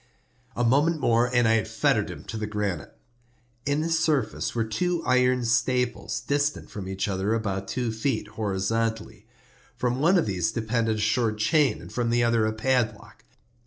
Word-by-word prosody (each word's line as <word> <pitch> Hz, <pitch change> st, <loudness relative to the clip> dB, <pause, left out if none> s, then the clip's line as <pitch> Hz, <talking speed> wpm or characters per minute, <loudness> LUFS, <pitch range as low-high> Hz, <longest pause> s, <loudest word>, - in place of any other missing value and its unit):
A 120 Hz, -, 0 dB
moment 145 Hz, +7 st, +3 dB
more 120 Hz, -1 st, +2 dB
and 120 Hz, -2 st, +3 dB
I 110 Hz, -, +4 dB
had 110 Hz, -, -2 dB
fettered -, -, +1 dB
him -, -, -8 dB
to -, -, -7 dB
the 110 Hz, -1 st, -3 dB
granite. 105 Hz, -7 st, -3 dB, 0.7 s
In 145 Hz, +2 st, +1 dB
its 165 Hz, 0 st, +1 dB
surface 145 Hz, -11 st, 0 dB
were 115 Hz, -, +1 dB
two 165 Hz, +11 st, -1 dB
iron 125 Hz, -1 st, +3 dB
staples, 125 Hz, +1 st, 0 dB
distant 145 Hz, +1 st, -1 dB
from 100 Hz, -3 st, -6 dB
each 95 Hz, +1 st, -2 dB
other 100 Hz, +2 st, 0 dB
about 100 Hz, -3 st, -3 dB
two 125 Hz, -3 st, -2 dB
feet, 110 Hz, -1 st, -2 dB
horizontally. 110 Hz, +2 st, -2 dB, 0.5 s
From 125 Hz, 0 st, -1 dB
one 170 Hz, +6 st, +4 dB
of 170 Hz, -, +2 dB
these 95 Hz, 0 st, -1 dB
depended 115 Hz, 0 st, 0 dB
a -, -, -4 dB
short 110 Hz, 0 st, +1 dB
chain, 135 Hz, +2 st, +1 dB
from 120 Hz, -1 st, -1 dB
the 120 Hz, 0 st, +2 dB
other 115 Hz, -2 st, +2 dB
a -, -, 0 dB
padlock. 115 Hz, -1 st, -1 dB
115 Hz, 170 wpm, -26 LUFS, 110-125 Hz, 0.7 s, I